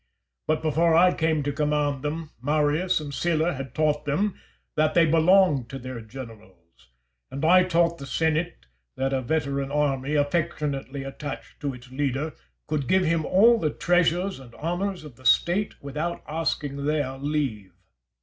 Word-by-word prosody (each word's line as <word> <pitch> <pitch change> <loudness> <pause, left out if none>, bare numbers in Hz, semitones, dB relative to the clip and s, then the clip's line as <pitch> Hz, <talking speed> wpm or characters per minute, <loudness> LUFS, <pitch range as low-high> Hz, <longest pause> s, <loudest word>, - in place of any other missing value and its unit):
But 155 0 0
before 160 +1 +3
I 180 +2 +6
came 160 -2 0
to 145 - -1
command 150 -2 0
them, 155 +2 -4
Marius 150 +6 +1
and 145 -2 -7
Sylla 170 +3 +1
had 135 -3 -7
taught 150 -1 +1
them 180 +8 0 0.4
that 155 0 +2
they 170 -1 +6
belonged 165 -5 +4
to 135 - -6
their 130 -2 -7
generals. 105 - -13 0.4
And 140 +4 -3
I 180 +2 +6
taught 170 -1 +2
the 140 - -8
senate 160 +3 -1 0.3
that 135 +1 0
a 135 - +1
veteran 140 0 -1
army, 145 -1 0
affectionately 145 -2 -1
attached 135 +2 -7
to 140 -3 -3
its 125 0 -14
leader, 140 +3 -2 0.3
could 150 -4 -2
give 185 -1 +3
him 165 -1 +1
all 230 +5 +5
the 155 - +1
treasures 175 +3 +1
and 120 -3 -14
honours 175 +3 -3
of 145 -6 -12
the 130 - -17
State 180 +10 +3
without 150 +5 -4
asking 145 -3 -2
their 145 -3 0
leave. 135 - -2
150 Hz, 160 wpm, -25 LUFS, 135-165 Hz, 0.4 s, I